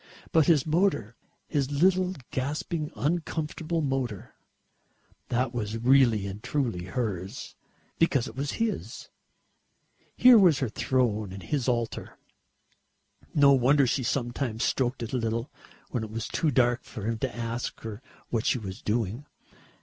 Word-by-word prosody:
But 160 -2 +4
his 155 -6 +4
motor 160 - +1 0.3
his 140 -4 0
little 185 +5 +2 0.2
gasping 150 +3 -2
uncomfortable 160 +4 -2
motor 135 -8 -3 1.0
that 125 0 0
was 110 -2 -3
really 120 -4 +4
and 100 +1 -6
truly 115 -13 -2
hers, 100 0 -4 0.4
because 140 -7 +2
it - - -9
was 140 +1 -2
his. 230 -2 -3 1.1
Here 250 -2 +8
was 175 -7 +5
her 130 -5 -1
throne 110 -4 0
and 95 0 -8
his 140 -5 -1
altar. 120 -2 -2 1.2
No 140 -1 +7
wonder 135 +2 +4
she 130 +2 0
sometimes 120 -1 -2
stroked 125 -1 0
it 115 - -6
a - - +2
little, 115 +2 -2 0.4
when 120 -4 -1
it 110 - -6
was 115 +1 -4
too 160 - 0
dark 120 -2 +2
for 105 - -8
him 115 0 -1
to 130 0 -3
ask 115 0 -4
her 110 0 -7 0.3
what 115 -2 -1
she - - +3
was 100 -1 -7
doing. 115 +5 -2
125 Hz, 140 wpm, -27 LUFS, 115-145 Hz, 1.2 s, Here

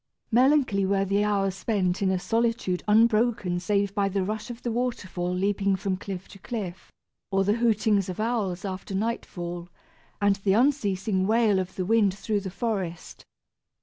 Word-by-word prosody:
Melancholy 255 -4 +4
were 195 0 +1
the 200 +2 +1
hours 200 -2 +1
spent 195 -2 -1
in 195 - +2
a 190 - +1
solitude 225 -2 0
unbroken 215 -4 +3
save 200 +2 0
by 200 -1 +1
the 195 0 0
rush 215 +4 -4
of 240 0 -8
the 240 - -1
waterfall 200 -7 -2
leaping 195 +1 +1
from 190 0 -2
cliff 190 -1 -7
to 195 - -13
cliff, 190 -4 -6 0.4
or 195 0 +2
the 205 +2 +2
hootings 215 -4 +2
of 185 - -5
owls 210 -4 -1
after 190 0 -5
nightfall, 175 -5 -3 0.5
and 200 -1 +3
the 195 -1 +1
unceasing 205 -6 +1
wail 220 -3 +3
of 185 0 -4
the 185 - -2
wind 205 -2 +3
through 210 0 -1
the 195 -1 -5
forest. 190 -5 -4
200 Hz, 165 wpm, -26 LUFS, 190-225 Hz, 0.5 s, Melancholy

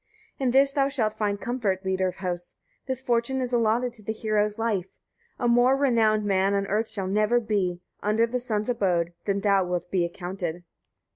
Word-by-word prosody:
52. - - -3
In 255 - +3
this 275 +2 +4
thou 275 -1 +2
shalt 225 -7 0
find 205 -2 -1
comfort, 205 -6 -2
leader 190 0 +1
of 180 - -4
hosts! 175 -2 -5 0.3
This 260 0 -3
fortune 240 +2 +1
is 250 -1 -3
allotted 235 +1 +2
to 230 - -8
the 215 - -3
hero's 215 -1 0
life: 215 -5 -1 0.5
a 240 - 0
more 245 +3 +4
renowned 225 -6 +2
man 195 0 +2
on 200 0 0
earth 215 +3 -1
shall 200 -3 -4
never 215 +5 +2
be, 195 -6 -1 0.2
under 215 +2 +2
the 250 +2 -2
sun's 215 -4 -2
abode, 180 -8 0
than 200 -1 0
thou 200 -2 +3
wilt 180 -1 -3
be 185 -2 +2
accounted. 175 -1 -4
215 Hz, 195 wpm, -26 LUFS, 190-240 Hz, 0.5 s, this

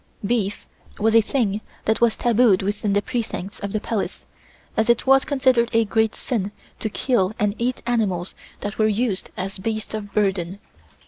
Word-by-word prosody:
Beef 205 -3 -1 0.3
was 220 +1 +2
a 230 - +7
thing 215 -3 0 0.2
that 220 +1 +1
was 235 -2 +4
tabooed 230 -5 +4
within 205 +1 -1
the 205 0 +2
precincts 210 -5 -4
of 200 - -4
the 215 - 0
Palace, 215 0 -3 0.5
as 220 +1 +1
it 235 - +3
was 270 0 +6
considered 260 -5 +3
a 225 0 +4
great 220 +1 +1
sin 205 -6 -2 0.3
to 220 - -1
kill 215 -3 +1
and 205 -1 +1
eat 245 +2 -1
animals 200 -7 0 0.3
that 205 +1 -5
were 215 - +4
used 215 -2 0
as 195 +1 -4
beasts 215 +2 -3
of 205 -2 -5
burden. 195 -3 0
215 Hz, 175 wpm, -23 LUFS, 200-235 Hz, 0.5 s, a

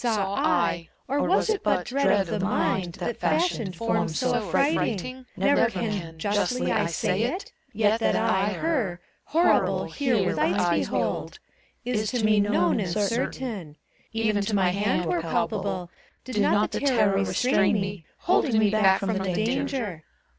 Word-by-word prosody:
Saw 210 -5 0
I, 170 -3 0 0.2
or 280 +2 0
was - - +2
it 435 -2 0
but 180 - 0
Dread 255 -6 +2
of - - -2
the 210 +4 -3
mind, 190 -2 0
that 240 - -4
fashioned 235 - 0
Forms 165 -6 -1
so 255 -1 +1
affrighting 235 - +1
t 255 +7 -8
Never 285 -5 +3
can 190 -6 -4
Justly 205 +8 0
I 210 -4 +1
say 185 +4 -1
itt 300 - -3 0.2
Yet 220 0 +2
that - - +1
I 205 -2 +1
Her, 225 - -1 0.3
Horrible, 335 +3 +2
here 245 -9 0
with 165 -4 -1
eyes 175 +3 +2 0.2
behold. - - -2 0.5
Is 215 -4 -1
to 235 -2 0
me 215 -1 +4
known 200 -3 +2
and 190 -4 -2
certain: 210 - -2 0.3
Even 220 -2 0
to 205 +1 -1
my 190 -2 +3
hand 200 -2 0
were 170 0 0
palpable, 180 +1 -2 0.3
Did 255 -5 -4
not 205 +1 +2
the - - -2
terror 240 -8 +2
restrain 200 0 +2
me, 195 -2 -4 0.2
Holding 285 - +2
me 215 -2 +3
back 195 -3 +4
from 205 +2 -1
the 195 - -1
danger. 230 - -2
210 Hz, 160 wpm, -25 LUFS, 190-240 Hz, 0.5 s, me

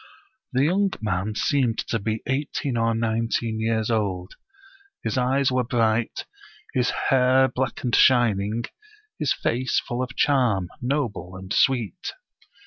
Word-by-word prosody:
The 130 +1 +2
young 195 +5 +2
man 105 0 -2
seemed 125 -3 +1
to 115 - 0
be 110 +2 -3
eighteen 135 -1 -2
or 115 0 +1
nineteen 115 0 -1
years 110 0 0
old; 95 -5 -1 0.7
his - - -2
eyes 130 +1 +2
were 125 0 +1
bright, 115 -2 0 0.5
his 125 -1 +1 0.2
hair 130 0 +4
black 130 -1 -3
and 120 -2 +1
shining, 115 -3 +3 0.6
his - - +1
face 125 +1 0
full 120 +1 -4
of 125 -1 -4
charm, 120 -11 +2
noble 125 -8 -2
and 95 +2 -6
sweet. 120 -9 +1
120 Hz, 135 wpm, -24 LUFS, 110-130 Hz, 0.7 s, hair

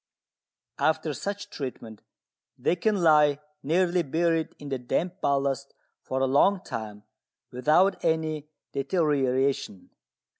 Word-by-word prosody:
After 155 -1 +1
such 200 +7 -5
treatment 115 -6 -7 0.6
they - - +1
can 195 +1 0
lie 150 -3 +5 0.2
nearly 175 +4 +2
buried 165 +1 0
in 145 - -9
the 135 -2 -2
damp 175 +9 -2
ballast 140 -1 0 0.3
for 130 0 -3
a - - +4
long 180 +9 +3
time 105 -2 -6 0.5
without 160 +9 +3
any 155 -2 0 0.2
deterioration. 140 - 0
150 Hz, 110 wpm, -27 LUFS, 135-170 Hz, 0.6 s, lie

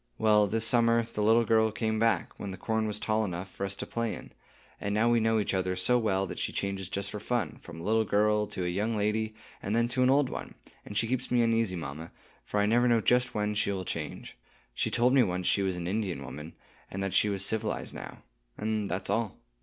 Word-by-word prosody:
"Well, 105 -1 +4
this 110 +3 +1
summer, 115 -1 +3
the 105 - -2
little 115 +2 +4
girl 110 -1 +3
came 110 0 -1
back, 115 0 +1
when 100 - -5
the 95 - -6
corn 110 -1 -1
was 105 0 -3
tall 110 0 +1
enough 90 -1 -4
for 100 - -3
us 100 - -2
to - - -5
play 115 -1 -2
in; - - -11 0.5
and 100 0 -2
now 115 +2 +3
we 120 - +4
know 115 0 +2
each 105 - 0
other 95 -1 0
so 120 +7 +3
well 95 -4 +1
that - - -6
she - - -1
changes 95 -2 -3
just 100 +1 -3
for 105 - -5
fun, 120 0 -2
from 85 -2 -10
a - - -8
little 110 +3 +2
girl 105 0 +2
to 90 - -4
a - - 0
young 105 +5 -1
lady, 110 +1 0 0.3
and 100 +3 -2
then 115 0 +3
to 130 +1 -1
an 125 - +5
old 140 0 +4
one; - - -7 0.3
and 105 - -5
she 115 - +3
keeps 130 +1 -2
me 120 -1 +3
uneasy, 115 -4 +1
mamma, 80 0 -6 0.3
for 105 - -2
I 105 - +3
never 120 +3 +3
know 120 -1 +4
just 125 +3 +2
when 105 0 0
she 100 -1 0
will 95 -2 -3
change. - - -5 0.4
She - - 0
told 125 +2 +3
me 135 - +6
once 90 -4 0
she 100 - +3
was 95 -2 0
an 85 - -4
Indian 95 -7 -2
woman, 75 +6 -8 0.3
and 95 +1 -4
that 95 - -2
she 105 - +4
was 100 -1 +1
civilized 110 0 -1
now,—and 100 - -6
that's 95 +2 -2
all." 110 -1 -1
105 Hz, 240 wpm, -29 LUFS, 95-115 Hz, 0.5 s, me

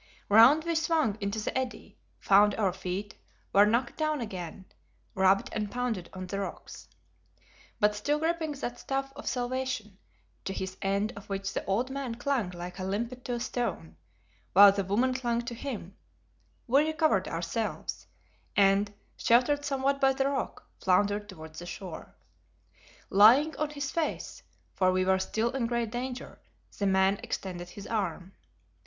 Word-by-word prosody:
Round 230 +9 +7
we 335 0 -1
swung 315 -8 +1
into 200 +2 -2
the 215 - -3
eddy, 260 -1 -4 0.2
found 205 0 +5
our 195 -4 +1
feet, 190 +3 -4 0.4
were 205 +1 +7
knocked 235 +3 0
down 310 -1 0
again, 190 -4 -6 0.5
rubbed 190 +1 +3
and 210 -1 -2
pounded 230 -8 -3
on 185 0 -6
the 195 +2 -4
rocks. 195 - -7 0.9
But 210 -1 +4
still 290 +9 0
gripping 320 -1 -1
that 245 -3 -5
staff 270 0 -3
of 290 - -9
salvation, 245 -5 -3 0.5
to 195 - -2
his 190 0 -4
end 200 +2 0
of 200 +1 -11
which 195 0 -3
the - - -2
old 235 +7 0
man 265 -4 -4
clung 240 -5 -1
like 180 +1 -8
a - - -3
limpet 230 +6 -3
to 245 - -2
a - - -3
stone, 225 - -3 0.6
while 200 +1 +10
the 200 0 -1
woman 230 +7 +1
clung 240 -2 -1
to 235 - -5
him, 230 -7 -6 0.7
we 275 +4 +4
recovered 310 - +1
ourselves, 170 +7 -3 0.5
and, 200 +1 +4 0.3
sheltered 255 +5 +3
somewhat 275 0 0
by 270 0 +5
the 270 0 0
rock, 275 -1 -3
floundered 205 +2 +2
towards 160 -4 -10
the 175 - -8
shore. 180 -3 -8 1.0
Lying 245 +11 +6
on 305 -1 -1
his 285 -1 -4
face 330 -2 -3 0.3
for 185 -1 +3
we 185 0 +1
were 190 0 +3
still 220 +5 -1
in 255 -3 -1
great 235 -2 -1
danger 250 +1 -5 0.4
the 200 - +1
man 190 +1 +3
extended 175 -2 -5
his 200 +2 -10
arm. 190 -4 -3
215 Hz, 160 wpm, -29 LUFS, 195-260 Hz, 1.0 s, while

